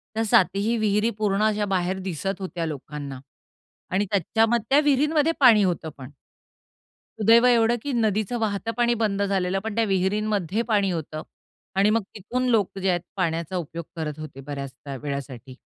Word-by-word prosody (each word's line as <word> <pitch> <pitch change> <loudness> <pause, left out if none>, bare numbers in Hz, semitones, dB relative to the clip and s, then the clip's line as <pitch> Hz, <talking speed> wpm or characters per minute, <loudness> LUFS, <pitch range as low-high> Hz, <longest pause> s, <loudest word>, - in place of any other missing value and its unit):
त्या 225 - +1
7 195 -3 +5
ही 220 +4 0
विहिरी 210 +1 +2
पूर्ण 210 -1 +1
अशा 210 -1 +1
बाहेर 185 +1 -1
दिसत 190 +1 -4
होत्या 180 -3 -3
लोकांना 145 -2 -6 0.7
आणि 200 +2 +2
त्याच्याम 220 +4 +2
त्या 250 +6 +2
विहिरीमध्ये 295 +2 +2
पाणी 235 -6 +7
होतं 175 -3 -1
पण. 130 -1 -9 1.1
सुदैव 230 +3 +6
एवढं 235 -1 +4
की 285 - -3
नदीचं 220 0 0
वाहतं 220 +1 -1
पाणी 240 0 +3
बंद 200 -2 0
झालेलं, 195 -1 0
पण 220 +1 -5
त्या 230 - +2
विहिरींमध्ये 200 0 0
पाणी 200 -2 +3
होतं 155 -2 -4 0.5
आणि 195 +2 +4
मग 225 +1 +2
तिथून 250 +6 -2
लोक 205 -4 +1
जे 190 0 0
आहेत 175 -1 +1
पाण्याचा 170 -1 -2
उपयोग 170 -1 -5
करत 155 -2 -4
होते 145 -3 -8
बऱ्याच 140 -1 -6
त्या 135 +2 -9
वेळासाठी. 135 -3 -6
195 Hz, 165 wpm, -24 LUFS, 165-225 Hz, 1.1 s, पाणी